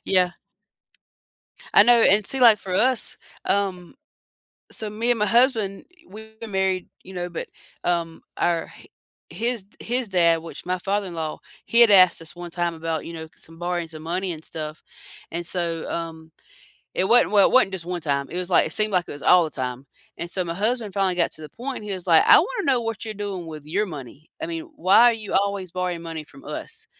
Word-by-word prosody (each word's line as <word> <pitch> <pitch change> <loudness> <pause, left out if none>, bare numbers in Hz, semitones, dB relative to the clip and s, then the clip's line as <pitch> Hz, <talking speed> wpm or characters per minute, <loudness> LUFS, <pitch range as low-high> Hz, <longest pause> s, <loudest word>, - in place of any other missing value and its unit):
Yeah. 180 -1 +3 1.4
I - - +9
know, 235 0 +5
and 205 0 +5
see, 270 - -2
like, 230 -3 +7
for 185 -2 -5
us, 255 +4 +1 0.3
um 190 -3 -1 0.8
so, 215 - -2
me 220 +3 -2
and 240 - +2
my 210 - +1
husband, 230 -4 +2 0.3
we 220 +1 -11
were 230 - -6
married, 190 -2 -1 0.2
you 190 - -12
know, 180 -1 -4
but, 170 - -6 0.3
um, 170 -2 -2
our 170 -1 0
h - - -16 0.4
his 230 -3 -2
his 245 0 -1
dad, 170 -3 +3
which 165 - -9
my 180 0 -1
father-in-law, 180 -5 -3 0.3
he 235 - +4
had 235 -3 +8
asked 185 -4 +6
us 165 +1 -10
one 175 -1 -8
time 175 -1 -1
about, 160 -1 -3
you 170 - -7
know, 160 -1 -7
some 165 0 -13
borrowing 175 -1 -2
some 155 -1 -10
money 185 +3 -2
and 160 0 -9
stuff. 155 -1 -7 0.5
And 170 +1 -3
so, 170 -2 -3
um, 160 -1 -6 0.6
it 185 - +1
wasn't 240 -2 +5
well, 200 -2 +6
it - - -3
wasn't 255 -7 +5
just 175 -2 -6
one 180 -2 -3
time, 140 -2 -1
it 175 - -5
was 180 0 -3
like - - +5
it - - -9
seemed 215 -1 +1
like 180 -2 +2
it - - -7
was 145 - -9
all 180 -1 +6
the - - -5
time, 130 -1 -5 0.3
and 170 - -5
so 185 0 -1
my 165 - -4
husband 215 +2 -1
finally 195 -3 +1
got 170 - +1
to - - -9
the 155 - -9
point, 255 - -6
and - - -9
he 205 - -5
was 185 -2 -5
like, 165 -3 +5
"I - - +9
wanna - - -1
know 245 -2 +2
what 225 -2 -4
you're 220 -1 -4
doing 195 -4 -5
with 155 -2 -9
your 200 +7 -1
money, 145 -1 -10
I 320 - -1
mean, 330 0 -6
why 230 +1 +6
are - - +1
you 215 -3 -7
always 195 -2 0
borrowing 180 -2 -3
money 165 -2 -6
from 275 - -16
us?" 450 0 -7
185 Hz, 220 wpm, -23 LUFS, 165-215 Hz, 1.4 s, I